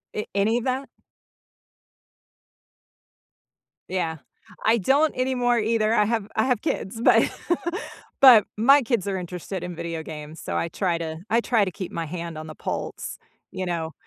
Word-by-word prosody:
A 210 - -4
any 210 +4 +2
of 240 - -3
that? 265 +1 -2 3.0
Yeah, 165 -4 -1 0.5
I 225 +2 +5
don't 280 - +2
anymore 250 -2 +1
either. 220 0 +1
I 210 -2 +4
have 220 -2 -1
I 220 - +2
have 250 -4 +1
kids, 225 +4 -3
but - - +6 1.0
but 240 -6 +9
my 275 +6 +6
kids 230 -5 -1
are 195 -1 -1
interested 180 +1 -5
in 180 -1 -5
video 165 -1 -4
games, 155 0 -8
so - - -3
I - - 0
try 175 0 0
to 160 -1 -5
I 230 +2 +3
try 230 -4 +2
to 185 - -3
keep 185 +1 -6
my 165 -1 -3
hand 170 0 -6
on 155 0 -7
the 155 - -9
pulse, - - -5 0.3
you 185 - -4
know, 165 -2 -3
200 Hz, 160 wpm, -24 LUFS, 170-235 Hz, 3.0 s, but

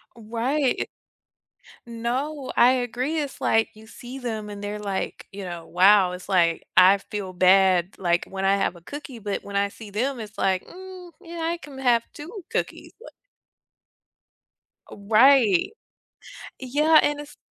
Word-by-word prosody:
Right. 240 +5 -1 1.0
No, 255 +5 -3
I 245 - +7
agree, 255 +5 -1
it's 285 -2 -5
like, 225 0 +2
you 215 +1 -15
see 245 +3 -10
them 220 -5 -5
and 205 0 -8
they're 210 +1 -4
like, 200 -2 -4
you 200 0 -8
know, 170 -2 -7
wow, 185 +1 +5
it's 180 0 -9
like, 170 -4 +2
I 185 +2 +7
feel 195 -1 -6
bad, 185 0 +4
like, 175 -2 +1
when 195 0 -5
I 195 +1 +3
have 195 -2 -1
a 170 - -14
cookie, 275 - -9
but 205 -1 -4
when 200 0 -8
I 200 0 +1
see 210 0 -12
them, 250 +5 -2
it's 215 -1 -9
like, 190 -1 0
"Hmm, 370 -1 -11
yeah, 335 0 -8
I 335 +1 -1
can 280 -2 -11
have 245 -3 +2
2 350 +6 -9
cookies." - - -4
But - - -13 1.8
Right. 215 -1 +4 0.9
Yeah, 300 +5 +4
and 290 0 0
it's 295 0 -10
220 Hz, 155 wpm, -24 LUFS, 195-275 Hz, 1.8 s, I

